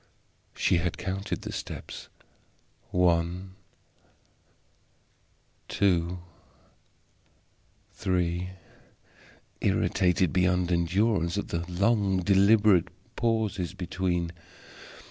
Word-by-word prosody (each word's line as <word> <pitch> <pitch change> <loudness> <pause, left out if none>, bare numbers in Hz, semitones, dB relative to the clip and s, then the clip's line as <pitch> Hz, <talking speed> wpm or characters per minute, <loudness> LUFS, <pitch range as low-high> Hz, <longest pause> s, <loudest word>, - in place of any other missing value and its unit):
She - - +2
had 85 0 -1
counted 95 -1 -4
the - - -5
steps - - -7 0.8
one 90 +1 +1 2.1
two 90 -2 +1 1.7
three 90 -1 -1 1.1
irritated 90 -2 +2
beyond 90 -1 +2
endurance 85 +1 +1
at - - -3
the 85 +1 -3
long 100 +1 +2
deliberate 100 -1 +5 0.3
pauses 110 -6 -1
between. 90 -2 -2
90 Hz, 70 wpm, -28 LUFS, 85-100 Hz, 2.1 s, deliberate